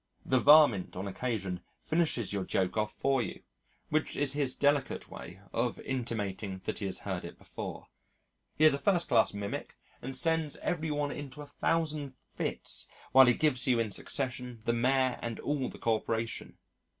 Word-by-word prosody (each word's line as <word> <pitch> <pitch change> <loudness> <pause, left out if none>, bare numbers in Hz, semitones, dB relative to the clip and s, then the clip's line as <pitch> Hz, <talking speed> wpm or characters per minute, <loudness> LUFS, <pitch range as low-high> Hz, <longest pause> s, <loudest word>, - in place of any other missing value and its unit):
The 130 - +3
varmint 140 -8 +6
on 95 +2 -4
occasion 95 -4 -3 0.2
finishes 155 - +1
your 100 -2 -1
joke 95 0 0
off 105 -1 0
for 135 -2 +1
you, 100 - -6 0.5
which 155 +1 0
is 140 -1 +2
his 140 -3 0
delicate 145 -2 +1
way 90 +3 -9
of 120 0 -1
intimating 105 -6 -3
that - - -3
he 100 - -3
has 95 - -1
heard 95 -3 -4
it 85 - -9
before. - - -7 0.7
He 155 - +4
is 155 - +7
a 140 - -1
first 175 +3 +2
class 115 -4 +4
mimic, 100 0 -5 0.2
and 135 +1 -5
sends 160 -3 +1
every 160 -3 -2
one 145 -1 -1
into 145 0 -7
a - - -9
thousand 150 -2 -1 0.2
fits - - -1 0.2
while 130 -1 +8
he 120 - +5
gives 145 -5 +1
you 125 -2 +4
in 110 -2 0
succession 125 -1 -2
the 115 - +2
Mayor 130 +2 +2
and 115 -1 -4
all 145 -3 -1
the - - -10
Corporation. 115 0 -2
125 Hz, 175 wpm, -31 LUFS, 110-145 Hz, 0.7 s, while